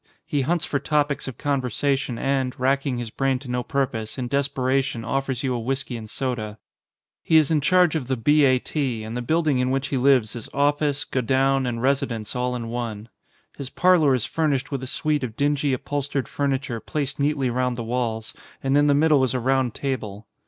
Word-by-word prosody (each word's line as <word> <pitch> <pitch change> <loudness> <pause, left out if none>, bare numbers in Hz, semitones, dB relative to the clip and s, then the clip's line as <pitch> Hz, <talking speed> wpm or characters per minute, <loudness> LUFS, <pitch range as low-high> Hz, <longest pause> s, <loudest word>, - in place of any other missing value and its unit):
He 150 -4 0
hunts 170 +4 0
for 140 - -1
topics 145 0 0
of 130 - -6
conversation 135 -1 -1
and, 135 -1 -1
racking 135 0 +1
his 120 -2 -5
brain 135 +1 0
to 130 +1 -11
no 125 0 0
purpose, 120 -4 -2
in 125 -2 -3
desperation 135 -3 0
offers 135 0 -2
you 130 -2 0
a 120 - -1
whisky 130 +1 -3
and 110 -2 -7
soda. 110 -5 -3 0.6
He 160 - +4
is 155 -1 +4
in 155 -2 +3
charge 180 +2 +4
of 150 -7 -2
the 130 -1 0
B. 145 +6 +4
A. 130 -1 +4
T., 125 -4 -2
and 110 +2 -6
the 125 - -2
build 160 +6 0
ing 135 -4 +3
in 125 0 +1
which 135 +2 -1
he 135 - 0
lives 125 -4 +3
is 120 - -7
office, 145 0 +1
godown, 135 +1 +1
and 120 -1 -3
residence 125 -5 -1
all 125 0 -1
in 115 -2 -5
one. 115 -2 -4 0.5
His 135 -2 -6
parlour 165 -6 +4
is 125 -2 -1
furnished 145 -1 -1
with 135 -2 -2
a 130 - -5
suite 150 +1 0
of 115 -3 -5
dingy 145 0 +1
upholstered 140 0 -2
furniture 135 -4 -2
placed 140 +4 -3
neatly 140 -3 +1
round 125 0 0
the 120 - -3
walls, 115 -2 -2 0.3
and 135 +1 +1
in 145 0 +4
the 145 - +4
middle 150 -2 +4
is 130 0 0
a - - +1
round 130 -1 +1
table. 110 -7 -4
135 Hz, 205 wpm, -24 LUFS, 125-145 Hz, 0.6 s, He